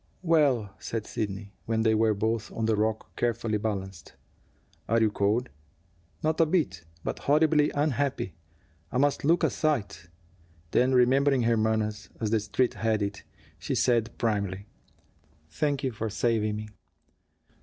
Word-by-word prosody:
"Well!" 140 - +2
said 115 -2 -4
Sidney, 100 -1 -4
when 110 0 +1
they 110 -1 +3
were 110 0 +3
both 110 +2 -1
on 115 - -2
the 110 -1 +2
rock, 110 +1 -2
carefully 115 -2 0
balanced. 95 -4 -4 0.8
"Are 115 +1 +4
you 110 -2 +3
cold?" 105 +5 +1 0.7
"Not 155 +1 +1
a 165 - +4
bit. 155 - 0 0.2
But - - -3
horribly 150 0 +3
unhappy. 145 - 0 0.6
I - - -1
must 145 +2 +2
look 165 +4 +3
a - - +3
sight." 105 - -1 0.6
Then, 130 +1 +3
remembering 130 +1 +4
her 115 0 +3
manners, 110 -2 -1
as 110 -2 -1
the 110 - +3
Street 105 +4 0
had 110 -2 0
it, 100 0 -4 0.4
she - - -2
said 115 -2 +1
primly: 100 -3 -1 0.9
"Thank 145 -2 -1
you 130 - 0
for 110 0 -4
saving 110 -1 0
me." 105 0 -6
115 Hz, 145 wpm, -28 LUFS, 105-135 Hz, 0.9 s, Are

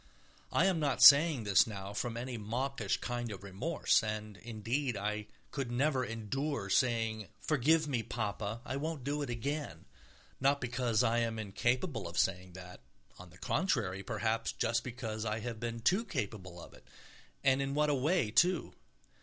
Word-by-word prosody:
I 185 - +3
am 190 -4 +2
not 135 -5 +1
saying 140 -2 +8
this 100 0 +4
now 100 -2 -6
from 115 +3 -3
any 125 +1 -4
mawkish 115 +1 -2
kind 120 -2 -3
of 100 -1 -8
remorse. 100 - +1
And, 110 -1 -4
indeed, 115 +3 -2
I 105 +1 -3 0.2
could 135 -4 -3
never 130 +1 +1
endure 115 -1 -3
saying, 115 -1 +1
"Forgive 155 +2 +2
me, 130 -5 0
Papa, 110 0 -4
I 130 - -3
won't 155 -1 -4
do 145 +3 -2
it 140 - -3
again," 140 +6 -4 0.5
not 140 +2 +3
because 125 -2 0
I 120 0 +2
am 115 -1 -1
incapable 115 - -1
of 85 0 -8
saying 90 0 0
that—on 90 -4 -14
the 90 - -17
contrary, 105 - 0
perhaps 115 +1 -1
just 115 0 0
because 115 -4 -5
I 110 -1 -1
have 115 -1 -5
been 115 0 -4
too 190 - +3
capable 100 - -5
of - - -12
it, - - -18 0.6
and 135 0 +4
in 135 0 -2
what 150 0 +2
a - - +2
way, 140 - +1
too. 175 +8 +3
115 Hz, 165 wpm, -33 LUFS, 105-140 Hz, 0.6 s, saying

